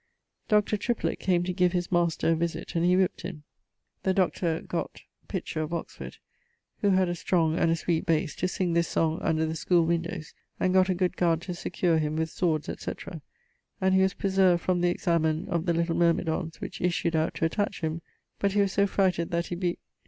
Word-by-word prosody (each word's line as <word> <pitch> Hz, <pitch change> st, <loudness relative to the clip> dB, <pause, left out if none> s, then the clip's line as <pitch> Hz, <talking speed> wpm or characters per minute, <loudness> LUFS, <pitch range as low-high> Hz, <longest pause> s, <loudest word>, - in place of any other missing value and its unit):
Dr. 210 Hz, -1 st, +3 dB
Triplet 235 Hz, +3 st, -1 dB
came 175 Hz, -2 st, +1 dB
to 180 Hz, 0 st, -2 dB
give 180 Hz, -1 st, +2 dB
his 175 Hz, -1 st, -1 dB
master 170 Hz, -2 st, +1 dB
a -, -, +3 dB
visit, 170 Hz, +1 st, -3 dB
and 165 Hz, -, 0 dB
he 180 Hz, +1 st, +4 dB
whip't 190 Hz, +2 st, +1 dB
him. 170 Hz, -4 st, -7 dB, 0.6 s
The 190 Hz, -1 st, +1 dB
Dr. 170 Hz, -3 st, +1 dB
gott... -, -, -5 dB, 0.2 s
Pitcher, 155 Hz, -, -3 dB
of 155 Hz, +2 st, -3 dB
Oxford, 170 Hz, -, -7 dB, 0.6 s
who 205 Hz, -, +2 dB
had 190 Hz, -1 st, +3 dB
a 175 Hz, -, -1 dB
strong 165 Hz, -2 st, +1 dB
and 165 Hz, -, +3 dB
a 165 Hz, -, +3 dB
sweet 165 Hz, +2 st, -1 dB
base, 155 Hz, -2 st, +1 dB
to 185 Hz, -, 0 dB
sing 180 Hz, -1 st, -1 dB
this 170 Hz, 0 st, +2 dB
song 160 Hz, 0 st, 0 dB
under 160 Hz, 0 st, +1 dB
the 160 Hz, -, -2 dB
schoole 170 Hz, +1 st, +2 dB
windowes, 170 Hz, -1 st, -2 dB, 0.3 s
and 185 Hz, -, +1 dB
gott 185 Hz, 0 st, +4 dB
a 185 Hz, -, +2 dB
good 180 Hz, 0 st, 0 dB
guard 170 Hz, -2 st, +2 dB
to 180 Hz, -, -5 dB
secure 170 Hz, -1 st, 0 dB
him 155 Hz, 0 st, -1 dB
with 160 Hz, 0 st, -1 dB
swords, 160 Hz, -4 st, 0 dB
etc., -, -, -6 dB, 0.6 s
and 190 Hz, 0 st, +2 dB
he 190 Hz, -, +5 dB
was 190 Hz, -1 st, +2 dB
preserved 190 Hz, -3 st, +2 dB
from 180 Hz, -1 st, +1 dB
the 175 Hz, -, +3 dB
examen 165 Hz, -2 st, 0 dB
of 170 Hz, -1 st, -1 dB
the 170 Hz, -, +3 dB
little 170 Hz, 0 st, 0 dB
myrmidons 165 Hz, -1 st, 0 dB
which -, -, -7 dB
issued 170 Hz, -1 st, 0 dB
out 160 Hz, 0 st, 0 dB
to -, -, 0 dB
attach 205 Hz, +5 st, -1 dB
him; 160 Hz, +1 st, -2 dB, 0.4 s
but 200 Hz, -1 st, +1 dB
he 205 Hz, -, +3 dB
was 200 Hz, -1 st, +1 dB
so 200 Hz, +1 st, +2 dB
frighted 185 Hz, -4 st, +1 dB
that 170 Hz, 0 st, -1 dB
he 175 Hz, -, -4 dB
bes... 175 Hz, -1 st, -1 dB
175 Hz, 210 wpm, -27 LUFS, 165-185 Hz, 0.6 s, he